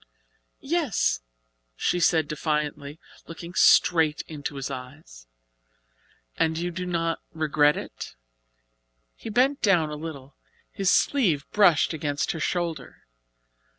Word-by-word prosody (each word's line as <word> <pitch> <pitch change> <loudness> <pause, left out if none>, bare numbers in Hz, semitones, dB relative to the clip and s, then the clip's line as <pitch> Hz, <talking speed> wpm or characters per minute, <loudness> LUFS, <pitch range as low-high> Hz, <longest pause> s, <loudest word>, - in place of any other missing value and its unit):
"Yes," 290 - 0 0.5
she 175 - 0
said 160 -2 +3
defiantly, 150 -1 -3 0.3
looking 170 +1 -9
straight 160 -5 +4
into 150 -2 -7
his 135 0 -5
eyes. 125 - -10 1.1
"And 160 0 +1
you 175 +1 -2
do 180 +1 -5
not 165 -2 -1
regret 150 -2 +2
it?" - - -8 1.0
He - - -9
bent 260 +6 +2
down 170 -7 +3
a - - -4
little. 145 -3 -8 0.4
His 195 0 +1
sleeve 180 - +2
brushed 180 -6 +4
against 145 -2 -2
her 160 - -5
shoulder. 165 -5 -3
160 Hz, 115 wpm, -25 LUFS, 145-175 Hz, 1.1 s, straight